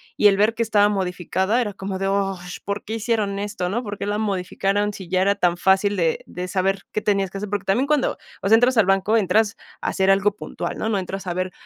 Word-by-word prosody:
y 210 - +5
el 195 -1 +4
ver 215 +2 +3
que 230 - +1
estaba 210 -2 +3
modificada, 190 +2 0
era 210 -5 -1
como 190 0 -5
de, 195 - -1
ah, 195 -1 0 0.2
¿por 200 +1 -4
qué 220 - -5
hicieron 215 -3 -1
esto, 200 -3 -3
no?, 230 +7 -2
¿por 205 -2 -6
qué - - -4
la 205 +1 -1
modificaron 200 0 -1
si 190 -4 -9
ya 185 0 +2
era 200 +1 +3
tan 175 -1 +1
fácil 195 +2 +2
de 165 -2 0
de 180 +1 -5
saber 195 +1 0
qué 215 - -1
tenías 195 -3 +1
que 195 - -6
hacer?, 210 0 -5
porque 205 -1 -3
también 245 +9 +1
cuando, 295 -3 +1 0.2
o - - -1
sea, 220 - +7
entras 245 +2 +3
al 220 - +6
banco, 195 +3 +2
entras 210 +1 +2 0.2
a - - -1
hacer 190 0 +1
algo 195 +1 +3
puntual, - - -5
¿no?, 220 - -2
no 210 -3 +1
entras 190 +1 -5
a 175 - -1
ver, 185 +1 -2
200 Hz, 250 wpm, -22 LUFS, 190-210 Hz, 0.2 s, sea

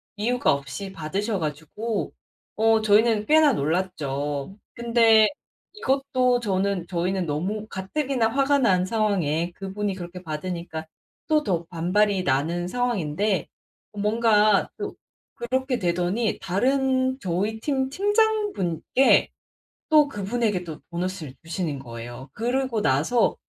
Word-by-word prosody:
이유가 230 -3 +1
없이 140 +8 -5
받으셔 195 +5 -2
가지고 160 +9 -3 0.4
어 225 0 +3
저희는 215 0 +3
꽤나 305 -2 +5
놀랐죠. 145 - -2 0.2
근데 230 -2 +5 0.5
이것도 265 -8 +1
저는 195 -4 -1
저희는 180 +1 -1
너무 190 +9 -2
가뜩이나 235 +5 -1
화가 275 +3 +2
난 185 -9 +3
상황에 185 -6 0
그분이 200 +1 -3
그렇게 180 0 -8
받으니까 160 0 -5 0.4
또 305 -1 +3
더 175 - -1
반발이 185 +4 +1
나는 165 +4 0
상황인데 205 -4 -1 0.5
뭔가 210 0 +3
또 - - -5 0.4
그렇게 260 +2 -1
되더니 180 +5 0
다른 260 +6 +1
저희 200 +3 -2
팀 265 +1 -1
팀장분께 405 - +2 0.6
또 305 -2 +6
그분에게도 200 - -2
보너스를 175 -5 -4
주시는 165 -3 -3
거예요. 120 +1 -9
그러고 245 0 -1
나서 165 - +2
205 Hz, 260 characters per minute, -24 LUFS, 170-240 Hz, 0.6 s, 또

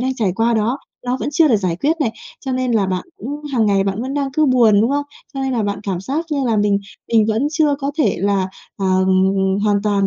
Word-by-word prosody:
đang 260 +1 -1
trải 210 -7 0
qua 230 +1 +2
đó, 225 +6 0 0.3
nó 250 +1 0
vẫn - - -2
chưa 310 +1 +4
được 225 - +4
giải 185 -4 -1
quyết 290 - +1
này. 250 -7 +1 0.3
Cho 265 -2 -4
nên 255 -1 0
là 205 -4 +2
bạn 185 -1 -2
cũng 290 +5 -6
hàng 225 -4 +2
ngày 195 -1 +2
bạn 200 +4 -2
vẫn 270 +2 -4
đang 280 -1 0
cứ 310 +2 +2
buồn, 230 -5 +5
đúng 230 +4 +2
không? 285 0 0 0.3
Cho 270 - -3
nên 265 -1 -1
là 230 -3 0
bạn 200 0 -2
cảm 190 -4 -3
giác 280 - -2
như 280 -2 0
là 225 -2 +1
mình 205 -1 +2 0.3
mình 220 -2 +5
vẫn 225 +6 +1
chưa 305 -2 +2
có 280 0 -2
thể 300 - +2
là, 195 0 +1 0.3
ờ, 195 - -2 0.8
hoàn 205 -1 +2
toàn 200 -2 +1
230 Hz, 255 wpm, -19 LUFS, 200-275 Hz, 0.8 s, buồn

